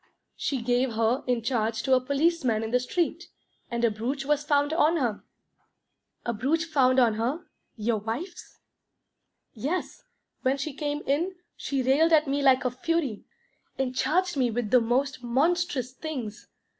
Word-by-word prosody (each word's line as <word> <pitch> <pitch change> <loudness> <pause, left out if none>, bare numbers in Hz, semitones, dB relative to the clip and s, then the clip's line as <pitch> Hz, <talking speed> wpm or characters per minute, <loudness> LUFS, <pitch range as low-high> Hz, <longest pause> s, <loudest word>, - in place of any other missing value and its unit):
She 265 -5 -2
gave 245 +1 +1
her 225 +3 +1
in 245 -2 0
charge 225 -2 -1
to 265 - +2
a 255 - +5
policeman 280 -4 +1
in 220 - -4
the 250 - +3
street, 340 +6 -1 0.4
and 235 0 0
a 230 - +3
brooch 255 +6 -3
was 295 0 +1
found 290 0 +2
on 325 0 +3
her." 240 -8 -1 1.0
"A 235 - -1
brooch 290 +10 0
found 265 -5 +3
on 235 -3 +4
her? 245 +10 -2 0.3
Your 220 0 0
wife's?" 235 - -6 1.0
"Yes. 290 - -3 0.4
When 260 +2 +1
she 280 +1 -4
came 295 +1 -3
in, 335 +7 0 0.2
she 275 -2 -2
railed 300 +6 +4
at 310 -1 +5
me 280 +1 0
like 265 -2 +4
a 250 - +1
fury, 280 -3 -2 0.5
and 255 -1 -2
charged 350 +5 +1
me 255 -2 +2
with 225 -2 -2
the 250 - +6
most 260 +3 0
monstrous 270 +1 0
things. 255 -8 -6
265 Hz, 160 wpm, -27 LUFS, 240-300 Hz, 1.0 s, the